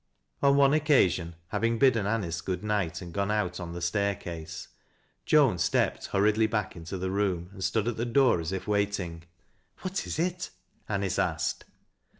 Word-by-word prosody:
On 140 Hz, 0 st, +5 dB
one 140 Hz, 0 st, +5 dB
occasion, 95 Hz, -, +3 dB
having 115 Hz, +3 st, 0 dB
bidden 115 Hz, -6 st, +3 dB
Anice 90 Hz, -6 st, -1 dB
good 90 Hz, +2 st, -3 dB
night 100 Hz, -5 st, -1 dB
and 85 Hz, -1 st, -9 dB
gone 100 Hz, +1 st, -1 dB
out 105 Hz, -4 st, -1 dB
on 85 Hz, -1 st, -6 dB
the 85 Hz, 0 st, -5 dB
staircase, 85 Hz, -4 st, -2 dB, 0.6 s
Joan 140 Hz, -, +4 dB
stepped 75 Hz, -, +1 dB
hurriedly 105 Hz, +2 st, +3 dB
back 105 Hz, -2 st, -2 dB
into 85 Hz, +3 st, -6 dB
the 95 Hz, +1 st, -2 dB
room 95 Hz, -3 st, -1 dB
and 95 Hz, -1 st, -7 dB
stood 110 Hz, +2 st, 0 dB
at 120 Hz, -, -1 dB
the 115 Hz, -, -1 dB
door 125 Hz, -5 st, +4 dB
as 80 Hz, +2 st, -4 dB
if 95 Hz, -1 st, -4 dB
waiting. 100 Hz, -5 st, -1 dB, 0.3 s
" -, -, -31 dB
What 190 Hz, +1 st, -3 dB
is -, -, -3 dB
it? 180 Hz, +2 st, -1 dB, 0.2 s
" -, -, -35 dB
Anice 100 Hz, -2 st, -1 dB
asked. 85 Hz, -5 st, -1 dB
100 Hz, 175 wpm, -28 LUFS, 90-115 Hz, 0.6 s, On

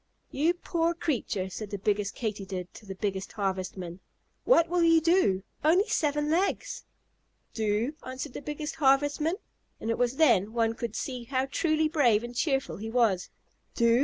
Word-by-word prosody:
"You 320 Hz, +6 st, +2 dB
poor 340 Hz, -1 st, 0 dB
creature!" 240 Hz, -, -1 dB
said 210 Hz, +2 st, -6 dB
the 200 Hz, -, -4 dB
biggest 205 Hz, 0 st, -1 dB
Katydid 195 Hz, -5 st, -4 dB
to 215 Hz, -, -13 dB
the 190 Hz, -, -6 dB
biggest 195 Hz, -1 st, -3 dB
Harvestman. 185 Hz, -3 st, -3 dB, 0.5 s
"What 335 Hz, -10 st, +5 dB
will 350 Hz, +1 st, +1 dB
you 330 Hz, -1 st, +6 dB
do? 320 Hz, -, +3 dB, 0.2 s
Only 355 Hz, +8 st, +4 dB
seven 295 Hz, 0 st, +1 dB
legs!" 370 Hz, +5 st, -1 dB, 0.7 s
"Do?" 220 Hz, +5 st, 0 dB
answered 260 Hz, +1 st, -6 dB
the -, -, -6 dB
biggest 295 Hz, +1 st, -5 dB
Harvestman, 290 Hz, +4 st, +3 dB, 0.4 s
and 225 Hz, -, -2 dB
it -, -, -2 dB
was 245 Hz, +1 st, +1 dB
then 230 Hz, -, +4 dB
one 225 Hz, -1 st, +1 dB
could 230 Hz, -1 st, -5 dB
see 250 Hz, -3 st, -4 dB
how 260 Hz, +1 st, 0 dB
truly 310 Hz, +3 st, +1 dB
brave 250 Hz, -9 st, +3 dB
and 240 Hz, 0 st, -7 dB
cheerful 270 Hz, 0 st, 0 dB
he 220 Hz, +2 st, -5 dB
was. 225 Hz, -6 st, +2 dB, 0.5 s
"Do? 235 Hz, 0 st, +4 dB
245 Hz, 160 wpm, -28 LUFS, 210-310 Hz, 0.7 s, you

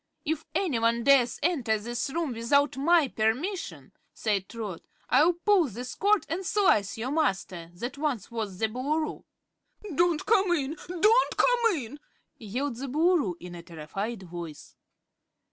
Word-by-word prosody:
"If 315 Hz, 0 st, -1 dB
anyone 235 Hz, -9 st, +1 dB
dares 255 Hz, -3 st, +4 dB
enter 265 Hz, -10 st, +1 dB
this 235 Hz, +4 st, -3 dB
room 315 Hz, -2 st, -2 dB
without 280 Hz, +6 st, +2 dB
my 315 Hz, +2 st, +4 dB
permission," 260 Hz, -, -2 dB, 0.2 s
said 200 Hz, -4 st, -1 dB
Trot, 210 Hz, -7 st, -6 dB, 0.3 s
"I'll 305 Hz, +7 st, +5 dB
pull 360 Hz, -1 st, +3 dB
this 245 Hz, +2 st, -6 dB
cord 410 Hz, 0 st, +2 dB
and 350 Hz, +4 st, -3 dB
slice 355 Hz, -, +2 dB
your 240 Hz, +4 st, -3 dB
master 190 Hz, -, -1 dB
that 245 Hz, +9 st, -6 dB
once 265 Hz, -8 st, -2 dB
was 215 Hz, -5 st, -4 dB
the 220 Hz, -, +1 dB
Boolooroo." 290 Hz, +7 st, -2 dB, 0.7 s
"Don't 340 Hz, +1 st, +2 dB
come 395 Hz, -5 st, +3 dB
in! 295 Hz, -2 st, -1 dB
Don't 420 Hz, +8 st, +3 dB
come 475 Hz, -4 st, +3 dB
in!" 270 Hz, +2 st, -7 dB, 0.4 s
yelled 245 Hz, +4 st, -3 dB
the 275 Hz, +2 st, -5 dB
Boolooroo 305 Hz, -, +2 dB
in 180 Hz, 0 st, -9 dB
a 175 Hz, -, -8 dB
terrified 190 Hz, +7 st, -6 dB
voice. 170 Hz, -3 st, -9 dB
265 Hz, 145 wpm, -27 LUFS, 220-330 Hz, 0.7 s, I'll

